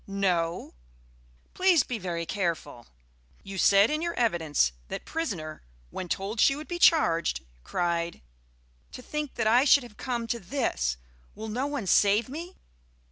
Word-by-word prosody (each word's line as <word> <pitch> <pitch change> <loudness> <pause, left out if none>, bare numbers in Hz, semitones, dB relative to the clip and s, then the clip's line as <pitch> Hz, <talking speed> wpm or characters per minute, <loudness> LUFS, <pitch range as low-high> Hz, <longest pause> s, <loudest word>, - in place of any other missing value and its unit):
"No." 180 -4 -1 0.8
"Please 365 -6 +4
be 240 -3 -4
very 170 -3 -3
careful. 165 - -3 0.6
You 195 -1 -6
said 200 +6 +5
in 305 +1 -1
your 340 0 -2
evidence 160 - +1 0.2
that - - -6
prisoner 185 - -4 0.3
when 180 - -6
told 200 +6 -3
she 275 - +5
would 300 +2 -8
be 350 0 -4
charged, 170 - +3 0.2
cried, 170 -1 -2 0.7
'To - - -8
think 300 0 -4
that 225 - -1
I 235 +4 +5
should 280 -1 +5
have 235 -4 -13
come 240 -3 -3
to 235 +1 -2
this! 175 - -1 0.4
Will 220 +1 -6
no 250 +6 -1
one 285 -7 -3
save 205 +5 +3
me?' 335 +6 -7
210 Hz, 150 wpm, -27 LUFS, 170-275 Hz, 0.8 s, said